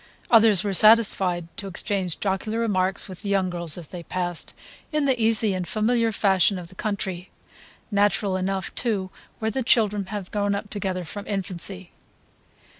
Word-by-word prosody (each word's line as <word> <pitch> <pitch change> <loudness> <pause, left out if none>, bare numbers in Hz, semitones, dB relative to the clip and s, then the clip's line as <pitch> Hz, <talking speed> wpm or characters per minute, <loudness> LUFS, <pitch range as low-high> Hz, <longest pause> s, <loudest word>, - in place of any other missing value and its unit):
Others 220 -5 +6
were 200 -1 -2
satisfied 195 -5 +5
to 200 -3 -5
exchange 190 -2 -2
jocular 205 +3 -2
remarks 190 -4 0
with 185 -3 -8
the 200 - -5
young 190 -2 +1
girls 170 -2 -4
as 170 -4 -5
they 180 - -7
passed, 175 0 -5 0.4
in 300 -2 0
the 260 -4 +1
easy 220 -2 +4
and 180 -2 -3
familiar 230 +3 +1
fashion 195 -2 +2
of 175 -2 -8
the - - -12
country, 190 -3 -4 0.6
natural 200 -1 +1
enough 190 +1 -2
too 200 -6 -1 0.3
where 220 -1 -2
the 265 - -2
children 210 -5 +2
have 200 -2 -6
grown 205 -1 0
up 205 0 -6
together 190 -3 -3
from 205 +5 -8
infancy. 190 -2 -2
195 Hz, 165 wpm, -24 LUFS, 185-215 Hz, 0.6 s, Others